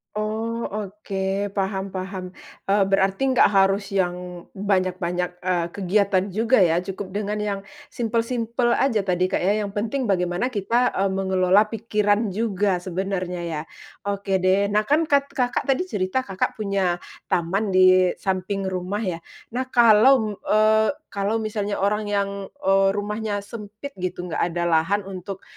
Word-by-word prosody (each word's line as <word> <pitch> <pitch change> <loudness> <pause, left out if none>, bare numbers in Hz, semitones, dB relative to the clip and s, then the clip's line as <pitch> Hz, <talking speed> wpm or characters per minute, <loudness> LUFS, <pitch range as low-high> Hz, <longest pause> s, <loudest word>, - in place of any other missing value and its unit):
Oh 220 +2 -2
oke 200 -1 -3
paham 195 0 -1
paham, 185 -1 -6 0.3
eee, 200 0 +4
berarti 195 +7 +2
nggak 255 - +5
harus 195 0 +2
yang 180 -1 -2
banyak-banyak, 185 -2 -1
eee, 175 -2 0
kegiatan 195 0 +1
juga 225 +5 +2
ya 175 -2 +3
cukup 190 0 -6
dengan 210 0 -2
yang 205 -1 -2 0.3
simple-simple 235 +1 0
saja 220 -7 +1
tadi 180 0 +1
Kak - - +1
ya 205 +3 +1
yang 200 - -4
penting 220 +6 -2
bagaimana 180 +6 0
kita, 235 +3 +1
eee, 195 - 0
mengelola 190 0 +3
pikiran 210 -1 +1
juga 200 -3 0
sebenarnya 185 -1 -3
ya. 155 -2 -3 0.4
Oke 200 -1 -1
deh 190 +2 +3
nah 210 +1 +2
kan 305 +7 +2
kat 280 -1 +2
Kakak 250 -3 0
tadi 275 +7 0
cerita 205 - -1
Kakak 195 +3 -2
punya 195 -4 0 0.3
taman 190 +4 0
di 185 -1 +5
samping 190 0 -2
rumah 185 +2 -3
ya? 180 -6 -3 0.3
Nah 260 - 0
kalau 235 +2 +6
m 220 - -1 0.2
eee, 215 +2 +3 0.2
kalau 205 +3 -1
misalnya 210 -1 -2
orang 210 +2 +1
yang, 200 -1 +1 0.3
eee, 195 -4 +3
rumahnya 205 +1 -2
sempit 210 +5 -9
gitu 180 0 -4
enggak 165 - -1
ada 175 +1 -2
lahan 175 +5 +2
untuk, 190 0 -7
200 Hz, 150 wpm, -23 LUFS, 185-215 Hz, 0.4 s, kalau